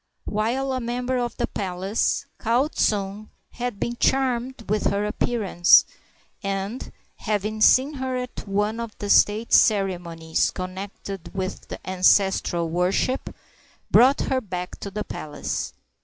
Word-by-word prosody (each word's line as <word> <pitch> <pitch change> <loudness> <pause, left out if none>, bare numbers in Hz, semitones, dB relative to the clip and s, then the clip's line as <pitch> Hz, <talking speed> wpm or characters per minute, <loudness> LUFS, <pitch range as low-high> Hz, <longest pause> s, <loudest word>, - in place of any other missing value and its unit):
While 245 +6 -1
a 255 - -1
member 250 +1 -2
of 240 -1 -3
the 240 - +1
palace, 190 +1 -1
Kau 245 +5 +2
tsung 205 -4 -1 0.2
had 245 -4 -4
been 240 - -2
charmed 255 -2 0
with 210 +1 0
her 200 +1 0
appearance, 210 -5 +4 0.6
and, 195 +4 -4 0.3
having 215 0 -2
seen 265 +6 +5
her 260 -2 -3
at 250 -3 -6
one 210 +3 0
of 230 -2 -6
the 205 -1 -2
state 215 +3 +4
ceremonies 175 -6 +2
connected 190 0 -7
with 190 -1 -4
the - - -6
ancestral 185 -2 +3
worship, 180 +10 0 0.6
brought 265 +3 +6
her 260 -1 0
back 180 -4 -6
to 200 - -5
the 210 +2 -4
palace. 150 -1 -4
210 Hz, 130 wpm, -24 LUFS, 190-245 Hz, 0.6 s, brought